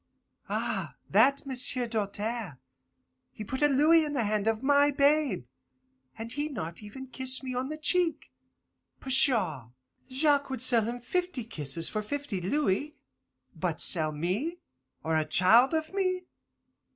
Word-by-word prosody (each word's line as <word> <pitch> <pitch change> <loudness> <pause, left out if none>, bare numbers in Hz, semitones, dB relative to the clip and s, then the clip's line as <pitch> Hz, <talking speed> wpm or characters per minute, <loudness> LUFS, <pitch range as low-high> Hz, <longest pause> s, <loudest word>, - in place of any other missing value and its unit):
Ah, - - -3 0.2
that 270 +8 +4
M'sieu' 255 -1 0
Doltaire, 215 - -3 0.7
he 215 - -9
put 260 +6 -5
a 295 - +5
louis 305 +4 +4
in 295 -1 -4
the 255 -5 0
hand 210 0 -1
of 225 +2 -1
my 285 +1 +4
babe, 285 - +1 0.7
and 225 +1 -7
he 295 +1 -3
not 165 - -7
even 215 +6 -10
kiss 260 +1 +1
me 255 -1 -5
on 255 +2 -3
the 310 - -5
cheek. 325 0 +1 0.7
Pshaw! 225 - +3 0.4
Jacques 285 +1 +1
would 260 -2 -3
sell 235 -4 +4
him 240 +2 -5
fifty 355 -1 -3
kisses 165 - -4
for 215 - -3
fifty 255 -4 -5
louis. 290 - -1 0.6
But 165 -1 -3
sell 155 -4 +3
me, 190 - -3 0.5
or 160 0 -1
a 155 - +2
child 230 - +4
of 315 +2 -3
me? 370 -2 -1
255 Hz, 145 wpm, -28 LUFS, 205-290 Hz, 0.7 s, a